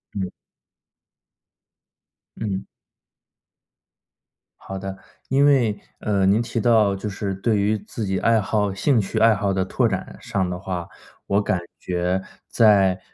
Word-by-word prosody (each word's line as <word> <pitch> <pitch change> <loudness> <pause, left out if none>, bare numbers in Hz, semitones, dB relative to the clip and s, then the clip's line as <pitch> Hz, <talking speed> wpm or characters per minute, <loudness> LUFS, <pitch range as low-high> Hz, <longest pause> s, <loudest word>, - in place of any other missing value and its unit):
嗯。 95 -2 -3 2.1
嗯。 100 -3 -3 1.9
好 95 - -7
的。 95 0 -6 0.3
因 140 +2 +4
为， 125 -7 +3 0.2
呃， 100 -2 +1
您 100 +4 +4
提 115 0 -3
到 110 -3 +4
就 105 +2 -4
是 100 0 -3
对 105 +3 +1
于 105 +2 +1
自 105 +2 -6
己 95 -1 -1
爱 115 -1 +3
好 105 -1 0
兴 120 +6 +2
趣 95 - -3
爱 115 0 +6
好 100 -1 0
的 95 - +1
拓 120 +4 +1
展 95 -3 -4
上 100 -6 -1
的 90 0 -4
话， 90 -3 -4 0.4
我 100 +1 +2
感 95 -3 0 0.2
觉 90 +1 -1 0.3
在 100 -4 +4
100 Hz, 145 characters per minute, -23 LUFS, 95-110 Hz, 2.1 s, 爱